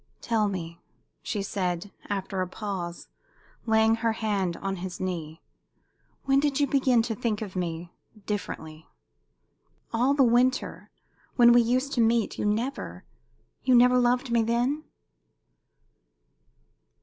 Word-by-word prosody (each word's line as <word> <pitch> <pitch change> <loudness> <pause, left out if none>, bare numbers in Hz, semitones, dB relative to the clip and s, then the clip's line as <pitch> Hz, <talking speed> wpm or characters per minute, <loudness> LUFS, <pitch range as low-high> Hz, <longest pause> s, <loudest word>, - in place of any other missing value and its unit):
"Tell 220 -3 +1
me," 170 -4 -5 0.4
she 205 - -3
said, 185 -1 -3 0.2
after 195 -1 -2
a 185 - -1
pause, 180 -3 -5 0.6
laying 220 0 +4
her 230 0 0
hand 200 -6 -1
on 195 0 -3
his 180 0 -6
knee, 165 -4 -5 0.8
"when 275 0 +3
did 285 -1 0
you 290 - +4
begin 260 -4 +3
to 230 -1 -2
think 220 -2 -2
of 195 -3 -9
me 170 -1 -4 0.3
differently? 160 -6 -5 1.1
All 250 +5 +2
the 280 - +5
winter, 250 +2 +1 0.5
when 240 -1 +7
we 240 - +6
used 255 +4 0
to 240 - +2
meet, 230 -1 +1
you - - -1
never 230 +7 -2 0.6
you 255 -1 +3
never 250 +1 +6
loved 245 +1 +1
me 235 -1 +3
then?" 245 +7 0
225 Hz, 130 wpm, -27 LUFS, 190-245 Hz, 1.1 s, when